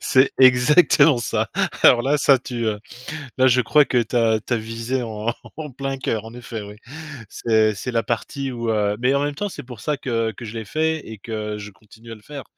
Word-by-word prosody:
c'est 130 +1 +3
exactement 140 +3 +6
ça. 120 - -1 0.3
Alors 120 - +6
là, 140 +4 +1
ça, 140 -1 +5
tu, 120 -2 -5
heu, 105 -1 -1 0.6
là, 130 0 +5
je 125 0 +4
crois 145 +5 +4
que 130 - 0
tu 110 - -16
as 110 -2 +2
tu 125 - -1
as - - +2
visé 115 +3 -3
en 110 0 -3 0.2
en 150 -2 -7
plein 135 +1 -4
cœur, 110 -4 -2
en 115 - -10
effet, 120 -2 -7
oui. 105 0 -10 0.5
C'est 110 -1 +2
c'est 125 +6 -5
la 115 -1 0
partie 135 +3 -3
où, 120 -2 -3
heu 105 -1 0
mais, 125 +2 +2
en 140 - +1
même 145 0 -2
temps, 205 +8 -2
c'est 200 - -8
pour 125 -3 -11
ça 150 +8 -1
que 115 -4 -2
que 110 - -11
je 115 0 -7
l'ai 110 - -5
fait 160 +6 -1
et 110 -1 -8
que 105 0 -5
je 105 0 -8
continue 110 +3 -16
à - - -6
le 110 - -17
faire. 140 +4 -9
120 Hz, 235 wpm, -22 LUFS, 110-135 Hz, 0.6 s, exactement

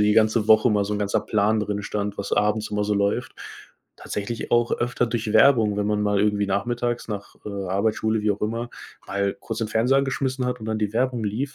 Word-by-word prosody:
die 105 0 +4
ganze 110 0 +3
Woche 110 +3 +6
mal 105 -1 +2
so 105 - -2
'n 105 - -2
ganzer 100 -1 +1
Plan 110 +1 +1
drinstand, 105 -1 -3
was 100 - -4
abends 105 +1 +1
immer 105 0 0
so 105 - 0
läuft. 100 0 0 0.7
Tatsächlich 110 +3 -5
auch 120 0 +2
öfter 120 0 0
durch 115 -2 -2
Werbung, 110 -4 +5
wenn 105 - 0
man 105 0 0
mal 105 -1 +1
irgendwie 105 -1 +1
nachmittags 120 +4 -1
nach, 100 -2 -6
äh, - - -3 0.2
Arbeit, 100 +3 +1
Schule, 110 0 0
wie 105 - +2
auch 100 - -8
immer, 115 +2 -2 0.4
mal 100 0 -1
kurz 115 -1 -5
den 110 -2 -2
Fernseher 125 +5 +2
angeschmissen 135 -1 -1
hat 125 0 -2
und 110 - -7
dann 110 0 -1
die 105 -1 -1
Werbung 125 0 0
lief 120 +7 -3
110 Hz, 220 wpm, -24 LUFS, 105-120 Hz, 0.7 s, Woche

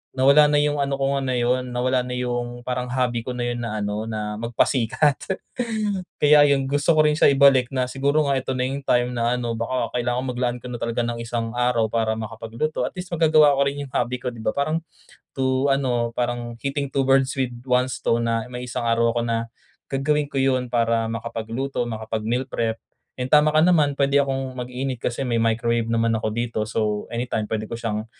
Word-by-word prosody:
Nawala 140 +3 +6
na 145 - +1
yung 145 0 +1
ano 140 0 0
ko 135 0 0
nga 140 - 0
na 130 - 0
'yun 125 +1 0
nawala 125 +1 +1
na 125 0 -5
yung 120 -1 -3
parang 125 0 -3
hobby 125 -2 0
ko 125 0 -5
na 120 - -2
'yun 120 - -4
na 110 -2 -3
ano 105 +2 -3
na 105 -1 -4
magpasikat. 125 +4 +1 1.1
Kaya 150 0 +7
'yun 135 -1 +2
gusto 145 +3 +2
ko 155 - +5
rin 150 0 +3
siya - - +6
ibalik 135 -3 +5
na 130 -1 0
siguro 140 +4 +1
nga 135 -1 +2
ito 130 - -4
na 125 - 0
yung 135 +1 -3
time 125 -1 +2
na 120 0 0
ano 120 -2 -2
baka 115 -1 -2
kailangan 120 +1 -1
maglaan 125 0 -1
ka 125 - -6
na 120 - -5
talaga 115 0 -1
ng 120 0 -3
isang 115 -1 -3
araw 120 -2 +2
para 110 -1 0
makapagluto. 115 +7 -3
At - - -9
least 180 -1 -7
magagawa 155 -3 +5
ko 140 - +1
rin 145 +1 -3
yung 135 - -10
hobby 125 +1 0
ko 125 0 -3
'di 120 - -11
ba. 110 - -1
Parang 155 +3 0 0.6
to 130 0 +1
ano, 120 -4 0
parang 120 0 -2
"hitting 140 0 -3
two 135 - +2
birds 135 0 +3
with 130 -2 0 0.2
one 125 0 +2
stone" 115 -2 0
na 115 -1 0
may 125 0 -5
isang 120 0 -3
araw 115 0 +2
ako - - +2
na 115 0 -2 0.4
gagawin 145 +2 0
ko 135 - -5
'yun 130 -2 +1
para 115 -1 +1
makapagluto, 115 +3 -3
makapag-meal 110 +2 -2
prep 115 -1 -1 0.4
and 125 +1 -2
tama 150 0 +6
ka 155 - +5
naman 150 -6 +3
puwede 140 0 +3
akong 135 -1 -2
mag-init 125 0 -4
kasi 125 +2 -2
may 120 -2 0
microwave 115 0 +1
naman 115 0 +2
ako 110 - -2
dito 115 0 -2
so 105 -1 -1
anytime 115 -2 -2
puwede 110 -1 -2
ko - - -6
siyang 110 -2 -3
125 Hz, 210 wpm, -23 LUFS, 115-135 Hz, 1.1 s, Kaya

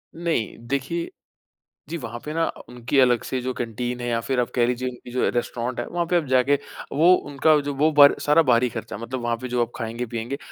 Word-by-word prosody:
नहीं, 165 - -2
देखिए, 140 +6 -2 0.8
जी 170 - -3
वहाँ 120 -5 -7
पे 150 - -4
ना 165 +1 +1
अ, - - -6
उनकी 125 +3 -1
अलग 125 -3 +4
से 130 - -3
जो 130 +1 -3
कैंटीन 120 +1 -4
है 120 - -3
या 115 -1 0
फिर 130 +2 -1
आप 120 - 0
कह 120 - +4
लीजिए 125 +1 -1
उनकी 125 -1 -11
जो 125 - +1
रेस्टोरेंट 120 0 -2
है, 120 - -2
वहाँ 175 0 -1
पे 180 - +2
आप 165 - 0
जाके, 130 +1 +3 0.4
वो 165 +6 +5
उनका 150 0 +2
जो 145 0 -3
वो 155 +3 +3
बर 145 -1 +7
सारा 150 +3 +5
बाहरी 125 -3 +3
खर्चा, 105 - -6
मतलब 120 +3 -5
वहाँ 120 0 -1
पे 130 - -4
जो 125 -1 0
आप 115 - -21
खाएँगे-पिएँगे, 115 +2 -4
125 Hz, 230 wpm, -23 LUFS, 120-145 Hz, 0.8 s, बर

